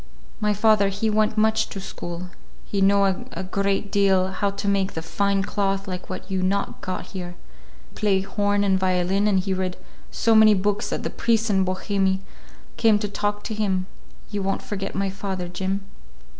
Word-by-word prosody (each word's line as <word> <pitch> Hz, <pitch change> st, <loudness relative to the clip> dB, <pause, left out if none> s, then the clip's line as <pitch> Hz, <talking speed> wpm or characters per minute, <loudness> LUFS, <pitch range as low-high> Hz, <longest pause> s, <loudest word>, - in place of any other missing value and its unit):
"My 210 Hz, -1 st, +1 dB
father, 210 Hz, -1 st, +4 dB
he 205 Hz, +3 st, -1 dB
went 215 Hz, 0 st, +1 dB
much 220 Hz, +1 st, +2 dB
to 195 Hz, -, -6 dB
school. 175 Hz, -1 st, -7 dB, 0.3 s
He 200 Hz, -, -2 dB
know 200 Hz, +1 st, +5 dB, 0.3 s
a -, -, -5 dB
great 195 Hz, +1 st, -1 dB
deal; 190 Hz, -2 st, +3 dB
how 200 Hz, +1 st, 0 dB
to 200 Hz, +1 st, -4 dB
make 195 Hz, -1 st, +1 dB
the 160 Hz, -, -4 dB
fine 200 Hz, +3 st, +1 dB
cloth 195 Hz, 0 st, -1 dB
like 185 Hz, -1 st, -5 dB
what 185 Hz, 0 st, -6 dB
you 190 Hz, -1 st, 0 dB
not 195 Hz, +2 st, -1 dB
got 185 Hz, -1 st, -4 dB
here. 180 Hz, -2 st, -6 dB, 0.6 s
He -, -, -22 dB
play 200 Hz, -3 st, +1 dB
horn 205 Hz, +1 st, 0 dB
and 190 Hz, -2 st, +2 dB
violin, 185 Hz, +2 st, +1 dB
and 195 Hz, -2 st, +3 dB
he 190 Hz, 0 st, -1 dB
read 185 Hz, -1 st, -2 dB, 0.3 s
so 230 Hz, -, +2 dB
many 220 Hz, -1 st, +7 dB
books 205 Hz, +2 st, 0 dB
that -, -, -3 dB
the -, -, -3 dB
priests 225 Hz, -1 st, +1 dB
in 190 Hz, -1 st, +3 dB
Bohemie 190 Hz, +1 st, 0 dB, 0.6 s
come 225 Hz, -3 st, +5 dB
to 210 Hz, 0 st, -2 dB
talk 205 Hz, +1 st, -2 dB
to 220 Hz, -, -4 dB
him. 195 Hz, -4 st, 0 dB, 0.5 s
You 205 Hz, -1 st, -2 dB
won't 195 Hz, 0 st, -1 dB
forget 195 Hz, -1 st, -4 dB
my 195 Hz, 0 st, 0 dB
father, 190 Hz, -2 st, -4 dB
Jim?" 190 Hz, +2 st, -3 dB
195 Hz, 185 wpm, -24 LUFS, 190-205 Hz, 0.6 s, many